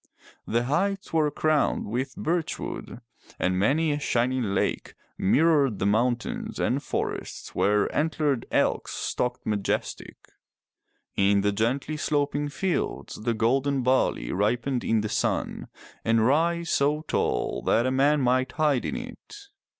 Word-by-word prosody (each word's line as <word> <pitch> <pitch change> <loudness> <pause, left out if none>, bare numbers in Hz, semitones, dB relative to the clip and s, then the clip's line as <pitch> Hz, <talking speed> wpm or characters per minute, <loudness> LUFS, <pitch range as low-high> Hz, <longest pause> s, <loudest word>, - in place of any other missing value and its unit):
The 115 +2 +1
heights 190 +9 -1
were 155 -2 +3
crowned 155 0 +1
with 130 +5 -3
birchwood, 165 -6 -3 0.4
and 95 0 0
many 150 +10 +2
a 145 - -1
shining 120 -6 0
lake - - -1 0.2
mirrored 140 - +3
mountains 120 +5 0
and - - +1
forests - - -4
where 105 0 +2
antlered 150 -5 0
elks - - +1
stalked 125 - -2
majestic. 105 -2 -2 1.0
In 100 +1 +3
the 105 +1 +2
gently 125 +9 -1
sloping 145 -1 0
fields 175 +5 -2
the 115 +1 0
golden 130 +4 +1
barley 125 - +1
ripened 120 +6 0
in 110 -1 +2
the 110 - -2
sun, 110 - -1 0.4
and 115 -1 +3
rye 170 +6 +2
so 150 -2 +1
tall 150 - -1
that 115 - +3
a 130 - +1
man 140 +3 +3
might 130 +1 +1
hide 150 -5 +1
in - - -2
it. 250 - -9
130 Hz, 130 wpm, -26 LUFS, 115-150 Hz, 1.0 s, were